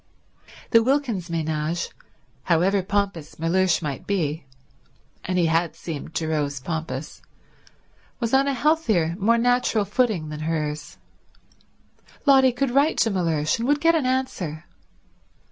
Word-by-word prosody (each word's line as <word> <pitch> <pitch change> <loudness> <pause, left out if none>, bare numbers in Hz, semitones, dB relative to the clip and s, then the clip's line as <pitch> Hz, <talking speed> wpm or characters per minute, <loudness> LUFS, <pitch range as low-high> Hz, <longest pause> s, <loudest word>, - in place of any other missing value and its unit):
The 230 - +6
Wilkins 240 - 0
ménage, 160 0 -2 0.6
however 185 +4 +2
pompous 195 -5 -2
Mellersh 175 +2 +1
might 140 -3 -5
be, 160 -7 -1 0.8
and 185 0 -2
he 175 - +3
had 165 0 +1
seemed 160 -1 -7
to 160 - -1
Rose 145 -3 -1
pompous, 155 -1 -5 1.0
was 230 0 -2
on 270 +1 +4
a 280 - +1
healthier, 235 - +1
more 230 +4 +3
natural 245 -3 +2
footing 210 - 0
than 150 0 -6
hers. 155 -2 -3 1.3
Lotty 265 -2 +6
could 250 +1 -1
write 280 +5 +3
to 225 - +2
Mellersh 165 -3 0
and 235 - -1
would 290 +1 +3
get 330 +2 +4
an 305 -6 +1
answer. 200 - -2
180 Hz, 130 wpm, -24 LUFS, 160-245 Hz, 1.3 s, The